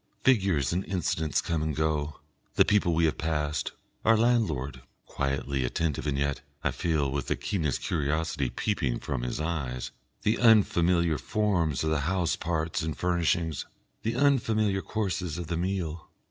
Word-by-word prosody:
Figures 95 - +3
and 90 +2 0
incidents 80 -4 0
come 85 -3 -1
and 80 -2 -1
go, 75 -1 -1 0.4
the - - +6
people 100 -5 +3
we 85 +1 +3
have 80 - 0
passed, 75 -2 -1 0.3
our 115 0 +5
landlord, 80 - +1 0.2
quietly 70 -1 -1
attentive 75 +4 -1
and 70 -1 0
yet, 70 0 -1 0.2
I - - +1
feel, 75 -5 0
with 70 0 -2
the - - +1
keenest 80 -9 -2
curiosity 75 -3 0
peeping 70 - -1
from 65 -4 -3
his 60 +2 -3
eyes, 70 -6 -3 0.3
the 110 +2 +2
unfamiliar 85 - +4
forms 90 -10 0
of 80 - 0
the 80 - +2
house 95 -3 +1
parts 80 +1 -1
and 80 -2 -3
furnishings, 85 -3 0 0.3
the 115 +1 -1
unfamiliar 110 -7 +2
courses 90 -7 -2
of 90 - -4
the 85 - 0
meal. 85 -3 -3
80 Hz, 155 wpm, -28 LUFS, 75-95 Hz, 0.4 s, the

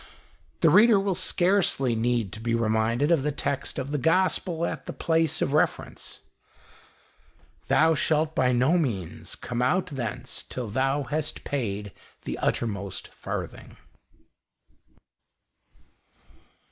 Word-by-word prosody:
The - - +5
reader 220 -1 +7
will 195 0 0
scarcely 175 -9 +1
need 115 -3 0
to 110 - -7
be 115 +1 0
reminded 115 +5 +1
of 165 -5 +4
the 150 +2 0
text 140 -1 -3
of 135 +1 -3
the 150 - 0
Gospel 170 +1 +1
at - - -5
the - - -4
place 165 -2 +1
of 135 - -1
reference 155 - -1 0.5
— - - -28
" - - -34
Thou 160 +1 +4
shalt 155 +1 +1
by 130 -3 +2
no 130 +8 +3
means 100 - -3
come 125 0 -4
out 180 +9 +2
thence 125 -2 -5
till 125 -4 -5
thou 135 +5 0
hast 150 +4 -3
paid 105 -7 -3 0.3
the - - -4
uttermost 100 -4 -2
farthing." - - -7
135 Hz, 130 wpm, -26 LUFS, 115-160 Hz, 0.5 s, reader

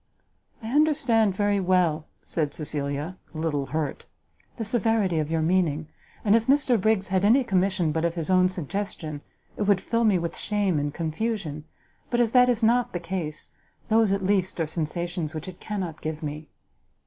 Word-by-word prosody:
"I 220 - -4
understand 265 -9 +3
very 205 0 +1
well," 175 -4 +1 0.2
said 150 -3 -2
Cecilia, 150 +3 -3 0.2
a - - -5
little 150 -4 -1
hurt, 150 +1 -3 0.5
"the 225 - -3
severity 220 -6 +1
of 150 -1 -2
your 165 -1 0
meaning; 160 -3 +1 0.4
and 205 +1 +5
if 230 0 +2
Mr 265 -5 +3
Briggs 210 -2 +1
had 190 0 +1
any 240 +6 +5
commission 185 -5 +1
but 160 +1 -1
of 170 0 0
his 165 +1 -2
own 185 0 +5
suggestion, 175 -3 -4 0.4
it - - -5
would 200 -2 +4
fill 230 +4 0
me 210 -4 +4
with 170 -1 -3
shame 200 -6 0
and 145 0 -1
confusion; 160 -1 -3 0.4
but 240 - 0
as 235 -2 +3
that 250 0 +6
is 235 -2 +1
not 240 +2 +3
the 175 - -2
case, 165 -3 -4 0.4
those 220 -2 +4
at 195 -1 0
least 190 -2 +1
are 165 - +2
sensations 165 +1 -3
which 155 +2 -5
it 185 -1 -9
cannot 185 -7 -4
give 155 0 -4
me." 150 0 -5
185 Hz, 180 wpm, -26 LUFS, 160-215 Hz, 0.5 s, that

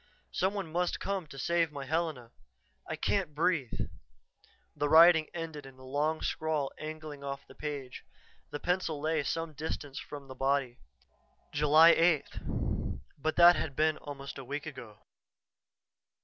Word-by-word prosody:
Some 190 +2 0
one 190 -6 -4
must 175 +2 0
come 195 -4 -2
to 140 - -11
save 165 +3 +1
my 140 -2 -6
Helena. 155 -6 -2 0.6
I - - -2
can't 180 -7 -1
breathe 155 -6 0 0.5
" - - -34
The 145 - 0
writing 160 0 +8
ended 160 -4 -6
in 135 -1 -14
a 130 - -14
long 150 +4 0
scrawl 155 -3 -1
angling 155 -2 -7
off 140 0 -5
the - - -15
page. 140 -4 -6 0.5
The 145 - -5
pencil 175 -3 -1
lay 155 +1 +1
some 165 +2 -3
distance 145 -2 -5
from 145 -2 -9
the 130 - -8
body. 135 -2 0 0.7
July 150 +3 +7
8th! 165 - 0 0.2
But 155 +2 -1
that 175 0 +8
had 140 -4 -3
been 155 0 +2
almost 140 -1 -8
a - - -7
week 145 +5 -5
ago! 130 -9 -10
150 Hz, 150 wpm, -31 LUFS, 140-165 Hz, 0.7 s, writing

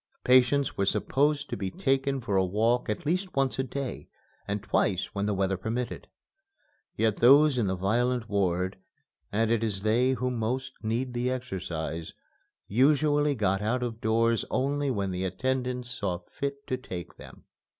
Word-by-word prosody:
Patients 130 +2 +4
were 100 - 0
supposed 145 +6 +1
to - - -1
be 95 -4 -3
taken 135 +5 0
for 105 -4 -2
a 95 - +4
walk 110 +7 +1
at 105 - -3
least 180 +4 -1
once 135 -1 +1
a - - +2
day, 135 0 -5 0.4
and 100 0 -2
twice, 100 -2 0
when 100 0 -1
the 105 - +1
weather 95 0 0
permitted. 115 +6 -4 0.9
Yet 110 -2 +2
those 140 +2 +6
in 110 - +1
the 95 - 0
violent 120 +5 0
ward 95 -2 0 0.5
(and 110 +2 +1
it 115 -1 +2
is 100 -3 -2
they 120 +4 +3
who 125 +1 -1
most 125 +3 -2
need 120 +3 -2
the 120 +1 0
exercise) 85 -10 -4 0.5
usually 145 +4 +3
got 95 -4 +1
out 120 +4 0
of 115 -2 -4
doors 115 +1 +2
only 140 +2 0
when 100 -6 -1
the 90 +1 -3
attendants 125 +5 -2
saw 95 -7 -2
fit 140 0 -4
to 130 - -2
take 90 -9 -8
them. - - -13
120 Hz, 165 wpm, -28 LUFS, 100-130 Hz, 0.9 s, those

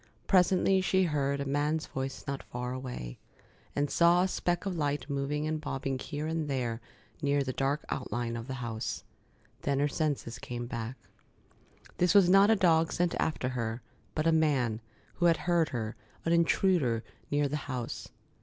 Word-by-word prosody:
Presently 190 0 +4
she 190 0 +3
heard 140 -4 0
a 140 - -2
man's 145 +3 0
voice 135 0 -4
not 140 0 -3
far 125 +1 -5
away, 125 - -6 0.6
and 145 0 +1
saw 170 +4 +4
a - - +2
speck 175 0 -1
of 195 -2 -2
light 145 -2 -1
moving 140 +1 -1
and 155 0 -2
bobbing 135 -2 -3
here 150 +2 -4
and 160 -1 -1
there 120 -4 -1 0.4
near 145 -1 +2
the 130 -1 -3
dark 140 +3 0
outline 120 -2 -2
of 115 +1 -6
the 130 - -4
house. 110 -1 -4 0.6
Then 140 -1 0
her 145 +1 +3
senses 145 -6 -2
came 120 0 -5
back. 120 +1 -5 1.0
This 180 +2 +3
was 185 -3 +7
not 195 +2 +7
a 225 - +6
dog 165 -4 +3
sent 175 -1 +1
after 140 -5 0
her, 115 -2 -3 0.3
but 155 - 0
a 165 - +5
man, 135 -8 +2 0.4
who 175 - +4
had 165 - +4
heard 170 -3 +2
her, 115 -2 -3 0.3
an 165 - +3
intruder, 170 - +3 0.3
near 145 0 +2
the 150 +2 -2
house. 125 -3 -4
145 Hz, 175 wpm, -30 LUFS, 130-165 Hz, 1.0 s, was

